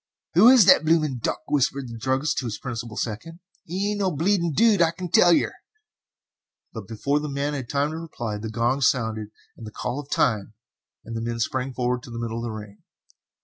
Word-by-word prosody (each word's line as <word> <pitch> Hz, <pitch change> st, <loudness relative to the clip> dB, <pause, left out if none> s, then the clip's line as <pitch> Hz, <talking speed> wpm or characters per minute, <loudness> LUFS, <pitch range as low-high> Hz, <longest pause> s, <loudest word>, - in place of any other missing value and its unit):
"Who 195 Hz, +9 st, +7 dB
is 255 Hz, -6 st, +7 dB
the 190 Hz, -, +8 dB
blooming 155 Hz, -5 st, +1 dB
duck?" -, -, -2 dB
whispered 140 Hz, -1 st, 0 dB
the 115 Hz, -1 st, -8 dB
druggist 135 Hz, +5 st, 0 dB
to 130 Hz, -, -5 dB
his 110 Hz, -3 st, -4 dB
principal 115 Hz, -3 st, -6 dB
second. 155 Hz, +10 st, -5 dB, 0.3 s
"'E 195 Hz, +4 st, -1 dB
ain't 205 Hz, -, -3 dB
no 195 Hz, -2 st, +1 dB
bleeding 170 Hz, +2 st, +1 dB
dude, 215 Hz, +3 st, +4 dB
I 165 Hz, -, +5 dB
can 175 Hz, +1 st, -7 dB
tell 175 Hz, -, +6 dB
yer." -, -, +2 dB, 1.2 s
But 110 Hz, -4 st, -8 dB
before 140 Hz, +6 st, -1 dB
the 150 Hz, 0 st, -4 dB
man 140 Hz, +1 st, -2 dB
had 130 Hz, -5 st, -5 dB
time 145 Hz, +1 st, 0 dB
to 160 Hz, -, -5 dB
reply, 120 Hz, -10 st, -5 dB
the 110 Hz, +1 st, -5 dB
gong 120 Hz, +5 st, 0 dB
sounded 110 Hz, -5 st, +1 dB, 0.3 s
the 110 Hz, -2 st, -9 dB
call 125 Hz, +5 st, -4 dB
of 145 Hz, -1 st, -9 dB
"time," 110 Hz, -2 st, 0 dB, 0.5 s
and 115 Hz, -, -7 dB
the 115 Hz, -, -3 dB
men 115 Hz, 0 st, -3 dB
sprang 130 Hz, +3 st, -1 dB
forward 125 Hz, 0 st, -1 dB
to 120 Hz, -, -12 dB
the 115 Hz, -, -7 dB
middle 115 Hz, -1 st, -4 dB
of -, -, -5 dB
the 120 Hz, -, -3 dB
ring. 105 Hz, -1 st, -9 dB
130 Hz, 210 wpm, -24 LUFS, 115-160 Hz, 1.2 s, the